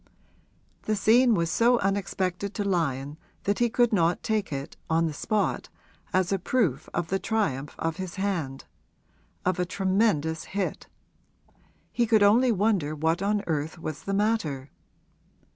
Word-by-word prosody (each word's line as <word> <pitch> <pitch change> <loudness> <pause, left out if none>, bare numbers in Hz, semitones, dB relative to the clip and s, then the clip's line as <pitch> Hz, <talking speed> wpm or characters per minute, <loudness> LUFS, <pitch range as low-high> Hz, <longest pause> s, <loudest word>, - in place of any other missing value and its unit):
The 215 - -1
scene 230 +3 +4
was 170 -2 0
so 240 +1 +4
unexpected 195 -1 -2
to 205 - -1
Lyon 150 -6 -1 0.2
that 200 +1 0
he 240 0 +3
could 240 0 +2
not 170 -3 +2
take 215 -4 -1
it, 140 0 -5
on 165 +1 +2
the 160 - -2
spot, 210 +7 -1 0.4
as 185 0 +1
a 195 - +1
proof 185 - 0
of 170 -2 -2
the 195 - 0
triumph 150 - -1
of 165 0 -2
his 185 -2 -5
hand 175 -9 -2 0.8
of 185 -1 +1
a - - +3
tremendous 185 -5 +1
hit: 195 - -2 1.0
he 240 -1 +1
could 215 -2 +4
only 235 +5 +5
wonder 195 -8 +1
what 160 +4 0
on 205 +1 0
earth 155 0 -2
was 155 -2 -6
the 195 - -3
matter. 180 -11 -1
190 Hz, 150 wpm, -27 LUFS, 160-210 Hz, 1.0 s, only